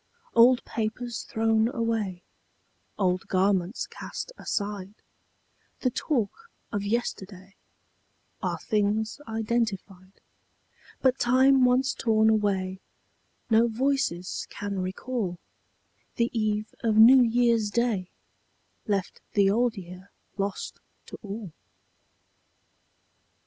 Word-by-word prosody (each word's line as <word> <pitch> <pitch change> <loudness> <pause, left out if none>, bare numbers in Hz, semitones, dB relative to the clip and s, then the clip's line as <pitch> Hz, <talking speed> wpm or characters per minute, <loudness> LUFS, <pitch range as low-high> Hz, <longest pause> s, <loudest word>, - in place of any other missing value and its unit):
Old 245 +2 +5
papers 230 +1 -3
thrown 225 0 +2
away, 225 -7 -2 0.7
Old 185 -2 0
garments 190 +1 +1
cast - - -7
aside, 200 -1 -4 0.9
The 255 - +1
talk 290 - -2 0.2
of 205 - -1
yesterday, 195 -3 -3 0.9
Are - - -1
things 215 +3 -1
identified; 215 -4 -2 0.9
But 260 0 +3
time 260 +1 +5
once 255 +2 +2
torn 220 -1 +3
away 190 -3 0 0.7
No 225 +1 +5
voices 235 -7 -1
can 200 -1 -4
recall: 185 +1 -3 0.8
The 235 0 +1
eve 215 -1 -1
of 220 -2 +2
New 250 +4 +9
Year's 235 -2 +3
Day 215 -5 0 0.8
Left 195 -3 -2
the 200 -1 +4
Old 235 +1 +1
Year 185 +1 -10 0.3
lost 200 -1 -4 0.3
to - - -10
all. 200 -4 -7
220 Hz, 95 wpm, -27 LUFS, 195-235 Hz, 0.9 s, New